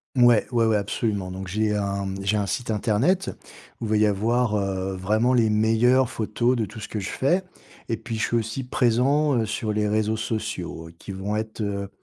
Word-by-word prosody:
Mouais, 120 -3 +5
ouais, 115 -2 +3
ouais, 110 - +3
absolument! 100 -2 -1
Donc, 95 +1 -6
j'ai 105 +3 0
un 100 -1 -1
mmh, 95 0 -4
j'ai 100 +2 +2
un 105 -1 +1
site 115 +6 -3
internet, 115 - +1 0.5
où - - -4
il 105 - -4
va 110 - +3
y 110 - +4
avoir, 110 +2 +1
heu, 95 -1 -2
vraiment 110 +7 +2
les 115 -3 +4
meilleures 115 +4 +3
photos 120 +3 0
de 110 - 0
tout 110 +3 -10
ce - - -7
que 110 - -3
je 95 - -4
fais. 175 +8 +1 0.4
Et 115 - 0
puis, 115 +1 -5
je - - -1
suis - - -1
aussi 115 +4 -3
présent, 130 +5 +2
heu, 110 - +1
sur 110 0 -2
les 105 0 0
réseaux 110 +1 +1
sociaux, 110 -7 -4
qui 100 - -7
vont 100 +3 -3
être, 110 0 -4
heu, 100 -1 -2
110 Hz, 215 wpm, -24 LUFS, 100-120 Hz, 0.5 s, Mouais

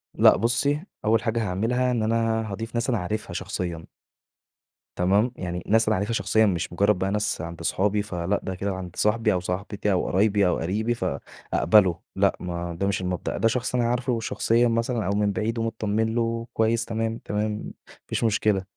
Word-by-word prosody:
لأ - - +6
بُصّي، 140 +7 +1 0.2
أول 110 0 +3
حاجة 115 0 0
هاعملها 115 +7 0
إن 115 -3 0
أنا 110 -1 0
هاضيف 115 +3 -5
ناس 120 +2 0
أنا 120 - +2
عارفها 105 +3 -4
شخصيًا. 85 -3 -4 1.1
تمام؟ 100 +7 +2
يعني 90 -1 -4
الناس 110 +1 +3
اللي 110 - +3
عارفها 100 +4 -1
شخصيًا 110 -1 +3
مش 85 -3 -1
مُجرّد 100 +2 +3
بقى 95 +1 0
ناس 105 -4 0
عند 85 +1 -7
أصحابي، 100 +5 +1
فلأ، 95 -1 -2
ده 95 - -4
كده 100 +1 -2
عند 90 -2 -7
صاحبي 110 0 +2
أو 90 - +1
صاحبتي 100 +3 -2
أو 90 - +1
قرايبي 100 0 +3
أو 90 - +1
قريبي 110 +7 -1
فأقبله، 90 -5 +1 0.2
لأ، 100 0 +3
ما 85 -1 -4
ده 100 - +1
مش 100 -1 0
المبدأ، 90 -1 -3
ده 115 - +3
شخص 125 +2 -1
أنا 120 - +2
عارفه 125 0 0
شخصيًا 115 +1 +2
مثلًا 115 -1 0
أو 100 - 0
من 105 -1 +2
بعيد 115 +3 -2
و - - 0
متطمّن 110 0 -1
له 115 0 -1
كويس 115 +1 +1
تمام، 115 0 -2
تمام، 105 +1 -2
ما 105 - -6 0.4
فيش - - -2
مشكلة. 105 -3 +2
105 Hz, 190 wpm, -25 LUFS, 95-115 Hz, 1.1 s, لأ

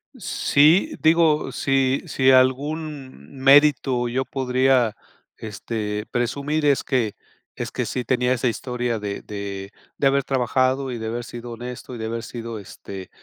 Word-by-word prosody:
Sí, 175 - +3
digo, 160 -1 +3
si, 135 -1 +1
si 130 0 +2
algún 135 +2 0
mérito 135 -2 +4
yo 130 +2 -1
podría, 130 -3 +1 0.4
este, 105 0 -4
presumir 140 +5 -1
es 140 - +3
que 120 -6 0 0.4
es - - -5
que - - -2
sí, 125 - -3
tenía 125 0 +1
esa 125 0 0
historia 120 -1 -2
de 100 -1 -5
de 100 -1 -6 0.3
de 140 - +3
haber 140 0 +2
trabajado 130 0 0
y 120 - -4
de 110 - -4
haber 120 +2 -3
sido 120 0 -8
honesto 125 +1 -8
y - - -7
de 110 - -4
haber 115 +1 -3
sido, 115 -2 -6
este, 95 -1 -10
130 Hz, 150 wpm, -23 LUFS, 115-135 Hz, 0.4 s, mérito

